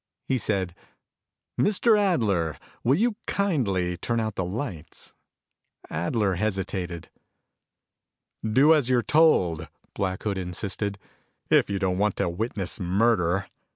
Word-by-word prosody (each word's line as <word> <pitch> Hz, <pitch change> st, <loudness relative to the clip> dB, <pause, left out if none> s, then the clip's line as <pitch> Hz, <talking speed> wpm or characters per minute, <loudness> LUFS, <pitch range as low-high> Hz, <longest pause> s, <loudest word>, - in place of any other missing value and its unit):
He 130 Hz, -, 0 dB
said, 95 Hz, -4 st, -1 dB, 0.9 s
"Mr. 215 Hz, +3 st, +4 dB
Adler, 110 Hz, -, +1 dB, 0.3 s
will 130 Hz, +4 st, +4 dB
you 220 Hz, +4 st, +1 dB
kindly 100 Hz, -, 0 dB
turn 115 Hz, +5 st, -1 dB
out 110 Hz, -1 st, -1 dB
the 95 Hz, -, -2 dB
lights." 90 Hz, -, -6 dB, 0.8 s
Adler 95 Hz, +5 st, 0 dB
hesitated. 95 Hz, -4 st, -3 dB, 1.3 s
"Do 130 Hz, +8 st, +5 dB
as 145 Hz, -6 st, +2 dB
you're 125 Hz, -2 st, +3 dB
told," 90 Hz, -, +3 dB, 0.3 s
Black 95 Hz, -1 st, -2 dB
Hood 100 Hz, -3 st, -1 dB
insisted, 100 Hz, +2 st, -3 dB, 0.5 s
"if -, -, +5 dB
you 100 Hz, -, -1 dB
don't 95 Hz, -1 st, 0 dB
want 105 Hz, -1 st, +2 dB
to -, -, 0 dB
witness 95 Hz, 0 st, -3 dB
murder. 95 Hz, -1 st, +2 dB
100 Hz, 120 wpm, -26 LUFS, 90-125 Hz, 1.3 s, Do